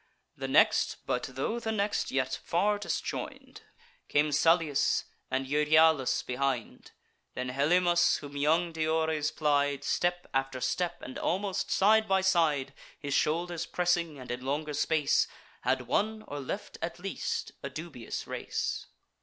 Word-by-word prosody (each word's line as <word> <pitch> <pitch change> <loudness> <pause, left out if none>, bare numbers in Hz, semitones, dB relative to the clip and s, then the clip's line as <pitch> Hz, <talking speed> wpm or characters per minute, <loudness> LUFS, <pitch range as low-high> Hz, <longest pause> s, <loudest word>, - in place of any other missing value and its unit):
The - - -4
next, - - +4
but 125 - 0
tho' 215 - -1
the 225 -1 -2
next, 205 -1 0
yet 130 -1 -1
far 205 +4 +1
disjoin'd, - - -5 0.5
Came 150 +1 +2
Salius, 160 0 +3 0.3
and 130 +1 -1
Euryalus 150 0 +3
behind; 125 -2 -2 0.5
Then 125 0 -3
Helymus, 175 +6 +3
whom 145 -1 -10
young 160 +4 +2
Diores 160 -1 0
plied, 145 -2 +1
Step 175 +3 0
after 135 -1 -1
step, 175 +7 -2
and 130 - -7
almost 195 +1 -1
side 220 +2 +4
by 190 -1 +3
side, 160 -8 +2 0.2
His 140 -1 -4
shoulders 170 +3 0
pressing; 175 -3 0
and, 125 -2 -8
in 125 +1 -4
longer 150 +3 -2
space, 150 0 +2 0.3
Had 130 -1 +1
won, 215 - 0
or 145 - -5
left 135 - -6
at - - -3
least - - -3
a 140 - -4
dubious 140 -4 -6
race. - - -3
155 Hz, 135 wpm, -30 LUFS, 140-175 Hz, 0.5 s, next